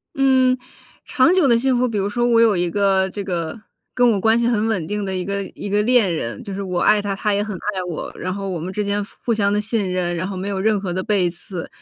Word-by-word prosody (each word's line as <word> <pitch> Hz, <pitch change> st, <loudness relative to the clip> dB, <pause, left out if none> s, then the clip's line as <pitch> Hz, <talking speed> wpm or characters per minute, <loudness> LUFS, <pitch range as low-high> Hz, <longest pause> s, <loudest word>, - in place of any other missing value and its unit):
嗯， 260 Hz, -2 st, +3 dB, 0.5 s
长 275 Hz, +7 st, +3 dB
久 370 Hz, -6 st, +4 dB
的 235 Hz, -3 st, +5 dB
幸 260 Hz, +1 st, +2 dB
福 250 Hz, 0 st, +2 dB
比 220 Hz, -3 st, -2 dB
如 195 Hz, 0 st, 0 dB
说 240 Hz, +3 st, -1 dB
我 235 Hz, -1 st, +4 dB
有 225 Hz, -4 st, +4 dB
一 175 Hz, 0 st, 0 dB
个 195 Hz, -1 st, +2 dB
这 205 Hz, -, -5 dB
个 170 Hz, +1 st, -3 dB, 0.3 s
跟 245 Hz, -1 st, +4 dB
我 200 Hz, -, 0 dB
关 225 Hz, +3 st, +3 dB
系 235 Hz, -, +1 dB
很 225 Hz, -2 st, +1 dB
稳 190 Hz, -8 st, -1 dB
定 205 Hz, +2 st, -3 dB
的 190 Hz, -1 st, -3 dB
一 180 Hz, -, -2 dB
个 200 Hz, +1 st, -2 dB
一 205 Hz, -, -6 dB
个 205 Hz, +1 st, +2 dB
恋 220 Hz, -6 st, +3 dB
人， 115 Hz, -8 st, -4 dB
就 200 Hz, -, -6 dB
是 200 Hz, -, -4 dB
我 180 Hz, -2 st, -2 dB
爱 210 Hz, -1 st, +4 dB
他， 200 Hz, -1 st, -2 dB
他 210 Hz, +1 st, 0 dB
也 200 Hz, -, +1 dB
很 210 Hz, -2 st, -4 dB
爱 195 Hz, 0 st, -3 dB
我。 165 Hz, -, -5 dB
然 185 Hz, -, -4 dB
后 195 Hz, +1 st, -4 dB
我 180 Hz, -3 st, -3 dB
们 180 Hz, +4 st, -5 dB
之 210 Hz, +2 st, -2 dB
间 205 Hz, 0 st, -1 dB
互 -, -, -17 dB, 0.2 s
互 235 Hz, -, +2 dB
相 200 Hz, -2 st, +1 dB
的 205 Hz, -, +1 dB
信 210 Hz, -2 st, -1 dB
任， 175 Hz, -1 st, -1 dB
然 175 Hz, +2 st, -3 dB
后 195 Hz, -, -5 dB
没 185 Hz, +1 st, -4 dB
有 195 Hz, -1 st, -2 dB
任 210 Hz, 0 st, +2 dB
何 190 Hz, -3 st, -3 dB
的 185 Hz, +1 st, -2 dB
背 190 Hz, -3 st, +1 dB
刺， 175 Hz, 0 st, -7 dB
200 Hz, 305 characters per minute, -20 LUFS, 185-225 Hz, 0.5 s, 的